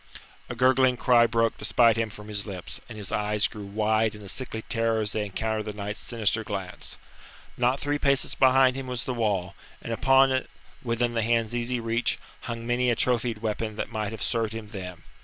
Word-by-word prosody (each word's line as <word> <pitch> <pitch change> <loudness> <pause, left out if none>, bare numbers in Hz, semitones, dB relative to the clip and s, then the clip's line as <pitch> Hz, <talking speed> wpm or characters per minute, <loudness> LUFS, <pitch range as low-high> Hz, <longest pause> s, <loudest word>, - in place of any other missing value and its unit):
A 120 - -4
gurgling 130 +1 +4
cry 120 -1 +5
broke 115 0 +1
despite 115 -2 +4
him 115 -1 0
from 105 0 -11
his 105 0 -4
lips, 95 -3 -4
and 110 - -8
his 100 -2 -4
eyes 105 0 +1
grew 105 -2 -8
wide 110 +1 +1
in 105 - -11
a 100 - -8
sickly 110 0 -4
terror 115 -1 0
as 105 -1 -1
they 105 -1 -1
encountered 110 +2 -2
the 105 - -4
knight's 105 0 -5
sinister 110 -2 0
glance. 95 -3 -5 0.6
Not 125 +2 +1
three 145 0 -1
paces 140 -2 +2
behind 130 -1 +5
him 135 -1 -5
was 125 -2 -3
the 130 - -3
wall, 100 -5 -1 0.3
and 115 - -5
on 135 +3 +5
it, 130 0 -1 0.3
within 120 0 0
the 115 - +1
hand's 115 0 +1
easy 120 +1 -1
reach, 115 +1 0 0.3
hung 115 0 -4
many 120 +1 +1
a 120 - +3
trophied 120 -2 0
weapon 110 0 -2
that 110 - -4
might 105 -2 -2
have 110 - -5
served 115 -2 0
him 110 -2 -7
then. 90 -5 -7
115 Hz, 205 wpm, -26 LUFS, 105-120 Hz, 0.6 s, cry